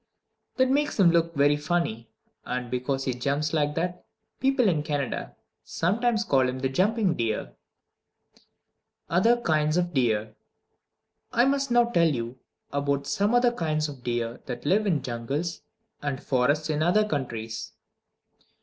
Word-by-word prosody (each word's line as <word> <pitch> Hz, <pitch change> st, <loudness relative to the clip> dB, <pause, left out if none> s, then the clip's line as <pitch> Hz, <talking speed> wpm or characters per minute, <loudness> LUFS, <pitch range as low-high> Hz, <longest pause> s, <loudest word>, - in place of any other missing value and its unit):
That 260 Hz, 0 st, +3 dB
makes 290 Hz, -3 st, 0 dB
him 175 Hz, -4 st, +6 dB
look 170 Hz, 0 st, +1 dB
very 145 Hz, +1 st, +4 dB
funny, 150 Hz, -7 st, -2 dB, 0.3 s
and 125 Hz, -1 st, -4 dB
because 135 Hz, +2 st, -1 dB
he 130 Hz, -, -1 dB
jumps 140 Hz, +5 st, -1 dB
like 150 Hz, -1 st, +1 dB
that 175 Hz, +2 st, -2 dB, 0.4 s
people 265 Hz, -3 st, +3 dB
in 160 Hz, -6 st, +2 dB
Canada 145 Hz, -3 st, -3 dB, 0.3 s
sometimes 225 Hz, +6 st, 0 dB
call 130 Hz, -8 st, +2 dB
him 130 Hz, -, -4 dB
the 130 Hz, 0 st, -1 dB
jumping 195 Hz, -, +2 dB
deer. 110 Hz, -, -2 dB, 1.6 s
Other 225 Hz, +8 st, +4 dB
Kinds 155 Hz, -6 st, +1 dB
of 175 Hz, -1 st, 0 dB
Deer 110 Hz, -5 st, +1 dB, 1.0 s
I 240 Hz, -, +4 dB
must 275 Hz, 0 st, +1 dB
now 240 Hz, 0 st, +5 dB
tell 170 Hz, -8 st, +3 dB
you 120 Hz, -2 st, -4 dB, 0.3 s
about 140 Hz, 0 st, 0 dB
some 205 Hz, +10 st, +1 dB
other 245 Hz, 0 st, +4 dB
kinds 155 Hz, -7 st, -1 dB
of 140 Hz, -4 st, -9 dB
deer 120 Hz, -1 st, -2 dB
that 125 Hz, 0 st, -6 dB
live 205 Hz, +7 st, +2 dB
in 155 Hz, -9 st, +1 dB
jungles 135 Hz, +8 st, -3 dB, 0.4 s
and 140 Hz, -2 st, -2 dB
forests 145 Hz, +4 st, +1 dB
in 150 Hz, 0 st, -1 dB
other 205 Hz, +6 st, +3 dB
countries. 115 Hz, -, -4 dB
150 Hz, 145 wpm, -26 LUFS, 130-185 Hz, 1.6 s, him